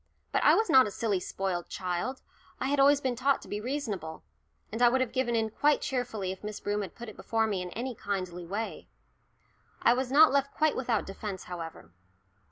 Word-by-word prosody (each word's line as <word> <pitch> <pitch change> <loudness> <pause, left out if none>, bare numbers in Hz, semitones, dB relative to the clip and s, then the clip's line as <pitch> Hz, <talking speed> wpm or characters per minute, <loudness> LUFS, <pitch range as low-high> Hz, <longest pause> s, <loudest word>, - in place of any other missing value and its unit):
But - - +1
I - - +7
was 445 - +2
not 265 -8 +6
a - - -3
silly 205 -2 -1
spoilt 180 -1 -3
child; 185 +8 -3 0.4
I 265 - -1
had 285 0 +1
always 280 +1 +6
been 260 -3 -1
taught 270 +3 +2
to - - -13
be 210 - -4
reasonable, 215 - -4 0.5
and 225 +3 -4
I 240 - +7
would 260 +2 +2
have 255 -3 0
given 250 -2 0
in 220 -1 0
quite 295 +6 +3
cheerfully 220 -7 -2
if 190 - -9
Miss 210 0 -5
Broom 205 0 -1
had 195 - -7
put 240 - -8
it 215 - -9
before 225 -1 0
me 200 -4 -1
in 180 - -5
any 250 +2 -3
kindly 185 -5 -4
way. 210 +5 -4 1.0
I 235 - +6
was 255 0 -2
not 305 +2 +7
left 280 0 0
quite 310 -1 +2
without 235 -4 0
defence, 195 -1 -6
however. 165 - -8
225 Hz, 210 wpm, -29 LUFS, 195-260 Hz, 1.0 s, I